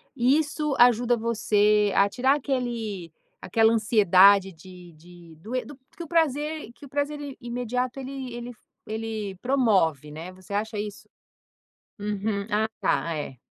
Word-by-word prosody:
isso 285 +3 +1
ajuda 240 0 +4
você 210 -2 +2
a 200 - +5
tirar 260 +6 +2
aquele 235 - -3 0.3
aquela 225 +4 +3
ansiedade 200 -3 +5
de 175 0 -14
de 170 +1 -16
do 220 +10 -7
e 250 - -1
do 290 - -10 0.2
que 340 - -5
o - - -9
prazer 305 -4 0
que 285 - -14
o - - -13
prazer 290 +2 -2 0.2
imediato 245 +1 -3
ele 265 -1 -6
ele 240 +1 -6 0.4
ele 220 -2 -4
promove, 195 - +1
né. 165 +4 -8
Você 185 +2 -11
acha 215 +1 -2
isso? 205 0 -6 0.9
Uhum. 205 0 -2
Ah, 215 +1 +2
tá, 165 - 0
é. 145 -4 -5
220 Hz, 140 wpm, -25 LUFS, 195-255 Hz, 0.9 s, a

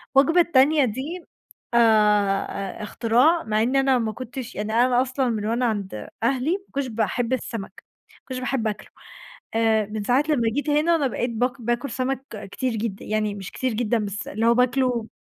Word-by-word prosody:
وجبة 325 +6 +5
التانية 290 -2 +4
دي 285 - -5 0.5
آآ، - - +4 1.0
آآ - - -6
اختراع 245 +10 +2
مع 215 0 0
إن 255 +3 0
أنا 270 -1 +3
ما 225 -2 -1
كنتش 255 +1 -7
يعني 210 +2 -3
أنا 245 +1 +4
أصلًا 260 -1 -1
من 215 -2 -2
أنا 235 +3 0
عند 200 - -3 0.2
أهلي، 265 +5 +1
ما 390 +1 -2
كنتش 275 -1 -2
باحب 230 +2 -1
السمك، 220 -6 -5 0.3
ما - - -22
كنتش 255 -1 -4
باحب 255 -3 -1
آكله 210 -1 -5 0.7
آآ 220 -2 +3
من 210 0 -5
ساعة 250 +6 +3
لمّا 240 -7 +2
جيت 290 +1 -1
هنا 310 +3 +3
أنا 285 -4 +1
بقيت 245 0 -2
باك 245 +3 -1
باكل 240 +4 -1
سمك 265 +1 -2 0.3
كتير 255 -1 -2
جدًا، 210 -2 -4
يعني 215 -1 -1
مش 195 -1 -8
كتير 255 -3 -2
جدًا 235 0 0
بس 205 -1 -4
اللي 220 +3 -1
هو 235 - +6
باكله 250 -2 +1
245 Hz, 185 wpm, -23 LUFS, 220-270 Hz, 1.0 s, هو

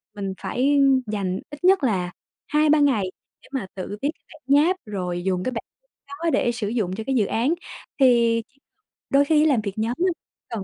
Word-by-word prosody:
mình 195 -2 -4
phải 280 +3 +1 0.3
dành 195 -3 -2
ít 290 +2 -11
nhất 375 -3 +5
là 185 -8 0 0.4
2-3 305 -1 +3
ngày 230 -10 +2 0.3
để - - -18
mà 265 -7 -3
tự 195 +2 -5
viết 285 - +1
cái - - -41
bản 310 - -17 0.2
nháp, 365 +2 +2
rồi 180 -4 -3
dùng 185 -1 0
cái 255 - -1
bản 230 - -4 0.4
đó 295 +4 -3
để 240 - +2
sử 230 -3 -3
dụng 205 -5 -1
cho 220 - -5
cái 270 - +1
dự 220 -5 +3
án. 240 +10 +1 0.5
Thì 235 -3 +4 0.7
đôi 280 0 +4
khi 305 +1 +3
ấy - - +4
làm 275 -8 +3
việc 200 -2 -4
nhóm 225 +3 -1
á 375 - +3 0.4
cần 225 -4 -4
235 Hz, 205 wpm, -23 LUFS, 200-285 Hz, 0.7 s, nhất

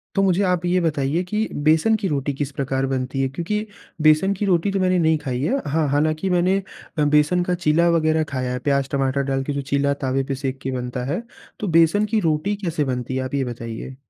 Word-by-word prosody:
तो 195 - +3
मुझे 190 0 +2
आप 180 -2 +1
ये 180 +1 +2
बताइए 150 0 0
कि 210 +4 -1 0.2
बेसन 160 +8 +4
की 205 -3 -2
रोटी 140 -2 -1
किस 140 +1 -3
प्रकार 135 -1 -1
बनती 135 0 -2
है? 135 - +1
क्योंकि 180 +9 -3 0.4
बेसन 155 +6 +4
की 200 +2 -2
रोटी 185 0 +2
तो 195 - 0
मैंने 185 -1 +2
नहीं 160 -1 +3
खाई 130 -4 -3
है। 265 - 0
हाँ, 155 +1 +1
हालांकि 155 +5 +1
मैंने 185 +2 +2 0.4
बेसन 150 +4 +3
का 180 0 0
चीला 170 0 +2
वगैरह 160 -1 +2
खाया 130 -1 -2
है, 125 - -3
प्याज-टमाटर 140 0 0
डाल 135 0 -1
के 145 +1 -3
जो 140 - -2
चीला 140 +1 0
तावे 135 -1 -1
पे 135 0 -3
सेक 135 0 -4
के 135 - -3
बनता 125 -1 -4
है। 200 - -2 0.4
तो 210 - -3
बेसन 170 +6 +3
की 215 +1 +1
रोटी 165 +3 0
कैसे 160 -3 0
बनती 125 0 -3
है? 130 - -1
आप 130 - -6
ये 140 - +1
बताइए। 120 +1 -6
150 Hz, 220 wpm, -22 LUFS, 135-180 Hz, 0.4 s, बेसन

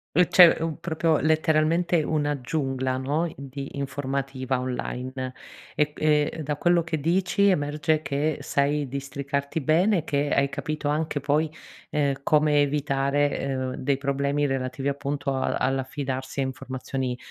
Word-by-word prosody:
Uhm, 180 +2 +5
cioè 175 -3 +7
u 165 -2 -3
proprio 165 -1 +1
letteralmente 160 +2 +2
una 145 -1 0
giungla 130 -1 -1
no, 150 +5 -1
di 140 0 -7
informativa 135 -1 -2
online 130 0 -4 0.4
e 150 0 +1
q - - -13
e 150 +1 +2
da 150 +1 -2
quello 175 0 +3
che 160 -2 -2
dici, 185 +5 +2
emerge 150 -2 +1
che 145 +2 -1
sai 145 0 0
districarti 140 +2 -3
bene 175 +8 +3
e - - -5
che 145 -2 0
hai 140 0 +2
capito 150 -1 -4
anche 150 0 0
poi, 150 +3 +1 0.4
ehm, 140 -2 0
come 150 0 +3
evitare, 145 0 +1
ehm, 130 -1 -2
dei 135 0 0
problemi 140 +1 0
relativi 135 +1 -2
appunto 140 0 -2
al 130 - 0
all'affidarsi 135 0 -2
a - - +2
informazioni 130 -1 -4
145 Hz, 140 wpm, -25 LUFS, 135-155 Hz, 0.4 s, cioè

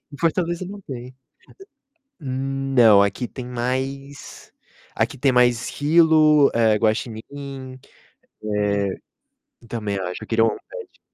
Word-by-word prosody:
Em - - -9
Fortaleza 170 +1 0
não 200 +2 -8
tem. 130 -6 -9 1.1
Não, 135 - +3
aqui 100 +5 -1
tem 130 0 -8
mais 130 +3 -5 0.4
aqui - - -1
tem 135 +1 +2
mais 120 -2 +3
esquilo, 155 -1 +4
eh, 110 -2 +3
guaxinim, 130 +5 -4 0.7
eh, 100 -2 0 0.7
também 105 -3 -3
acho, 90 -1 -5
eu - - -10
queria 115 0 +3
um 110 - -1
pet. - - -10
130 Hz, 115 wpm, -22 LUFS, 115-140 Hz, 1.1 s, esquilo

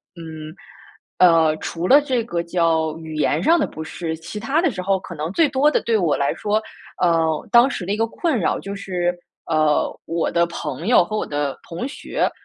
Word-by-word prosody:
嗯， 160 -1 -9 0.6
呃， 165 -3 +5
除 170 +2 -4
了 285 +3 +8
这 260 -5 -1
个 175 -7 -2
叫 165 -2 0
语 160 -1 -8
言 155 +2 +1
上 335 +1 +4
的 - - +1
不 160 - -7
适， 160 0 -5
其 170 +6 -8
他 275 +9 +1
的 345 -6 +2
时 185 -3 -5
候 195 +1 +1
可 185 -2 -9
能 155 0 -4
最 305 +5 +3
多 275 +3 +3
的 - - +1
对 230 -1 +1
我 170 -7 +1
来 140 - 0
说， 210 +1 0 0.4
呃， 165 -1 +2
当 240 +3 +6
时 205 - -4
的 195 - -3
一 205 - 0
个 225 +1 +1
困 300 +2 -1
扰 175 - 0
就 200 - -6
是， 180 -3 -2 0.3
呃， 155 -2 +1
我 165 0 -1
的 170 0 +3
朋 155 +1 -5
友 240 -7 +6
和 215 +4 -4
我 - - -1
的 145 -1 -2
同 170 +7 -5
学， 280 - -2
175 Hz, 225 characters per minute, -21 LUFS, 160-220 Hz, 0.6 s, 了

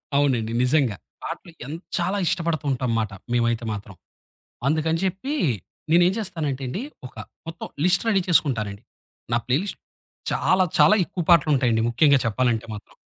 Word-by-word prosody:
అవునండి, 125 -6 +2
నిజంగా. 125 -6 +2 0.3
పాటలు 170 - -6
ఎన్ 155 +4 -5 0.2
చాలా 200 +2 0
ఇష్టపడుతూ 165 -3 -1
ఉంటాం 125 -2 -1
మాట 110 - -2 0.2
మేమైతే 120 -1 +1
మాత్రం. 100 -2 -8 0.7
అందుకని 160 +2 +1
చెప్పి 195 +11 -2 0.6
నేనేం 175 +2 +5
చేస్తానంటేండి, 145 - -3 0.3
ఒక - - -20 0.3
మొత్తం 165 +1 -6 0.2
లిస్ట్ 180 +2 +3
రెడీ 195 -3 +3
చేసుకుంటానండి. 115 - +1 0.5
నా 120 - +3
ప్లేలిస్ట్ 160 +11 0 0.5
చాలా 185 0 +3
చాలా 155 +8 +7
ఎక్కువ 175 - -4
పాటలుంటాయండి 135 -8 +4
ముఖ్యంగా 140 +3 +5
చెప్పాలంటే 115 0 +1
మాత్రం. 105 - -11
145 Hz, 130 wpm, -24 LUFS, 120-170 Hz, 0.7 s, చాలా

